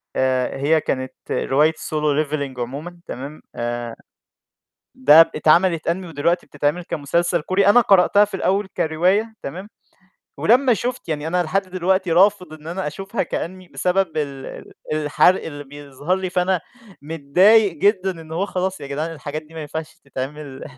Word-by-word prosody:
آآ، 130 0 0
هي 155 +3 +2
كانت 130 -1 -3 0.2
رواية 150 +4 +2
Solo 150 -1 -1
Leveling 140 -4 -4
عمومًا 150 +8 -6
تمام، 140 +4 -7
آآ 120 -1 -4 1.0
ده 150 +5 +8
ب 165 - -3
اتعمل 165 +3 +3
Anime 185 +3 -1
ودلوقتي 170 +3 -1
بتتعمل 145 +4 -1
كمسلسل 170 +4 0
كوري 185 +5 +1
أنا 245 +4 +7
قرأتها 200 0 +5
في 205 - -10
الأول 195 +1 0
كرواية 185 +8 +1
تمام، 185 +8 -7 0.7
ولمّا 250 +1 +4
شُفت 245 -2 -4
يعني 155 -1 -2
أنا 180 +2 +1
لحد 195 +5 0
دلوقتي 185 -1 0
رافض 185 -1 +3
إن 155 0 -12
أنا 180 +2 -4
أشوفها 195 +8 -3
كAnime 185 +1 -5
بسبب 180 -3 0
ال 140 -3 -3
ال - - -10 0.2
الحرق 155 +4 +3
اللي 145 -2 -7
بيظهر 145 +4 -4
لي، 185 -1 -4
فأنا 180 0 +1 0.4
متضايق 180 +8 +4
جدًا 190 +3 +1
إن 160 0 -11
هو 185 +5 -1
خلاص 190 0 -3
يا 140 - -7
جدعان 150 +4 -3
الحاجات 155 0 -6
دي 155 +1 -19
ما 160 - -6
ينفعش 160 +2 -6
تتعمل 140 +1 -7
160 Hz, 155 wpm, -21 LUFS, 145-185 Hz, 1.0 s, ده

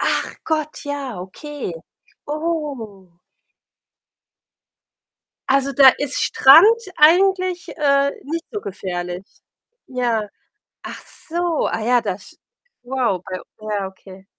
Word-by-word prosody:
Ach - - 0
Gott, 310 -1 -2
ja 280 -8 -5
okay. 275 - -7 0.5
Oh. 280 - -4 2.3
Also, 275 +1 +2
da 270 0 +8
ist 285 -1 -1
Strand 275 +7 +7 0.3
eigentlich, 365 +3 +4
äh, 280 -2 +2
nicht 330 +4 -4
so 420 - -4
gefährlich. 180 - -5 0.6
Ja. 235 -5 -1 0.5
Ach - - -8 0.3
so, 345 -1 0
ah - - -2
ja, 245 +1 +3
das 200 -3 -6 0.4
wow, 245 -7 -1
bei 185 -1 -6 0.3
ja, 205 -2 -1
okay. 190 0 -13
265 Hz, 100 wpm, -20 LUFS, 200-305 Hz, 2.3 s, da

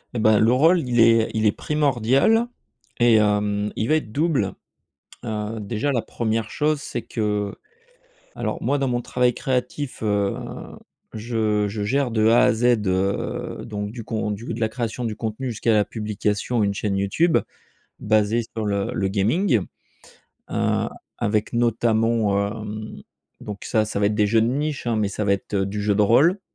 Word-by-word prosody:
Et - - 0
bah, 110 -1 +4
le 110 +2 +4
rôle 165 +7 +4
il 120 -1 +1
est 115 -1 +5
il 110 0 +1
est 105 - +5
primordial 145 - +2 0.5
et 120 -1 +5
hem, 105 0 +1
il 110 - -1
va 155 - +4
être 150 -9 -2
double. 145 - 0 0.7
Heu, 110 0 -3
déjà 110 +7 -2
la 120 -4 0
1re 110 -1 -2
chose 150 0 0
c'est 120 - -4
que 105 -3 -2 0.8
alors - - -3
moi, 145 - +1
dans 135 -2 0
mon 120 0 0
travail 125 0 +1
créatif 130 +1 -3
heu, 100 -2 0 0.8
je 110 -2 0
je 105 0 -4
gère 130 +4 0
de 110 -1 +2
A 115 +2 +5
à - - +4
Z 115 +2 -1 0.2
heu, 95 +2 -1
donc 105 -2 -5
du 115 0 -7
con 110 -1 -2
du 105 +4 -5
de 115 - -5
la 110 - +2
création 120 +1 -4
du 110 -2 -3
contenu 110 +4 -4
jusqu'à 115 +1 0
la 105 -2 +3
publication 105 +1 -2
et - - +3
une 100 - -1
chaîne 100 -1 -2
YouTube, 155 - +2 0.6
basée 110 +2 +2
sur 110 -1 -2
le 100 -1 -1
le 95 - -1
gaming. 115 - +2 0.9
Heu, - - 0 0.3
avec 105 +2 -1
notamment 115 -2 +2
heu, 110 0 -7 0.4
donc 105 -2 -7
ça 110 -1 +1
ça 105 - -3
va 100 - +1
être 105 - +1
des 105 -1 +2
jeux 110 +2 +3
de 115 - +1
niche 145 +1 -2
hein, 115 -2 +1
mais 105 -2 +1
ça 105 +2 -3
va 100 - +3
être 100 +1 -2
du 100 +2 -3
jeu 105 0 +1
de 105 - +3
rôle, 150 - +4
110 Hz, 180 wpm, -23 LUFS, 105-120 Hz, 0.9 s, est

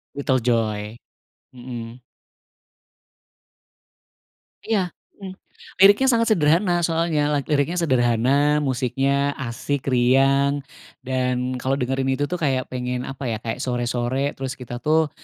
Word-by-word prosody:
Little 135 -2 +1
Joy. 110 -2 -1 0.6
Mhm. 120 -1 -8 2.6
Iya, 195 -6 0 0.2
mhm. 190 -2 -8 0.5
Liriknya 205 +7 +7
sangat 230 -2 +3
sederhana, 175 +1 +2
soalnya. 160 -3 0
Lak 140 -2 -1
liriknya 150 +4 +1
sederhana, 135 +2 +2
musiknya 135 +1 0
asik, 135 +3 -3
riang, 135 +3 +3 0.4
dan 125 0 -1
kalau 130 - 0
dengerin 135 +1 -1
itu 145 +2 -1
tuh, 180 - -2
kayak 135 -6 -1
pengen 125 0 -3
apa 135 0 -7
ya? 110 - -2
Kayak 115 +2 -4
sore-sore, 125 +2 -1
terus 130 -1 -4
kita 120 -1 -7
tuh, 155 +2 +2
135 Hz, 115 wpm, -22 LUFS, 125-150 Hz, 2.6 s, Liriknya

